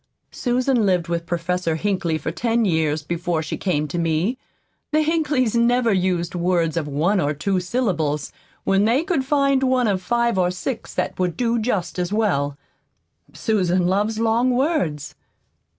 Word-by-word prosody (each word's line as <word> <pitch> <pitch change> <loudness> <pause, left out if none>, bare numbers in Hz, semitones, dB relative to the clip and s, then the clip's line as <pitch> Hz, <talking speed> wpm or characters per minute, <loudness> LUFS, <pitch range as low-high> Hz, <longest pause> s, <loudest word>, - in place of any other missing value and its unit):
"Susan 250 -1 +1
lived 180 -4 +1
with 170 0 -2
Professor 175 -1 -1
Hinkley 175 -3 -1
for 155 - -3
ten 230 +5 0
years 160 -4 0
before 170 0 -2
she 150 - -4
came 155 -6 -1
to 175 +3 -3
me. 165 +8 0 0.6
The 310 0 +3
Hinkleys 300 -7 +1
never 235 -1 +3
used 180 -2 0
words 175 -2 0
of 160 -3 -1
one 165 +8 +1
or 145 0 0
two 190 +6 0
syllables 175 - -1 0.3
when 195 +1 +2
they 245 +7 +2
could 335 -7 0
find 275 -1 +2
one 255 -2 +2
of 195 -3 0
five 235 0 +1
or 180 -1 +3
six 220 +6 -4
that - - -2
would 180 -2 -1
do 235 -1 +1
just 210 -6 -2
as 180 +1 -1
well. 160 -10 0 0.8
Susan 185 -5 +1
loves 205 +4 +1
long 230 +3 +2
words." 250 - 0
190 Hz, 160 wpm, -22 LUFS, 170-235 Hz, 0.8 s, The